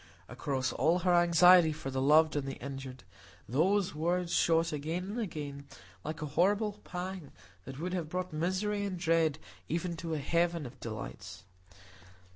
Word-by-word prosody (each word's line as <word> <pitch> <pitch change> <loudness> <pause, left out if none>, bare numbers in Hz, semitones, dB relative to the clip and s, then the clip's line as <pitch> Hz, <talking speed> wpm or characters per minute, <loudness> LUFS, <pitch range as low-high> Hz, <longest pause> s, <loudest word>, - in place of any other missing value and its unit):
Across 135 -3 -2
all 160 +8 +2
her 180 - +4
anxiety 175 0 +6
for 135 -3 -6
the 130 0 -1
loved 155 +3 +5
and 140 -2 -1
the 135 - -4
injured, 135 -1 -8 0.4
those 185 - +2
words 170 +3 -1
shot 165 -1 +2
again 160 +5 -3
and 235 - -4
again, 145 -9 -5 0.4
like 155 +1 -5
a 145 -2 -6
horrible 205 +5 +2
pang 180 -3 -6 0.3
that 135 +1 -8
would 180 +3 -3
have 170 -4 -3
brought 180 0 -3
misery 190 +6 -1
and 195 -2 -3
dread 165 -3 +2 0.3
even 170 +2 -1
into 165 -1 -4
a - - -1
heaven 170 +2 0
of 125 +1 -10
delights. 100 -5 -7
165 Hz, 160 wpm, -31 LUFS, 140-180 Hz, 0.4 s, anxiety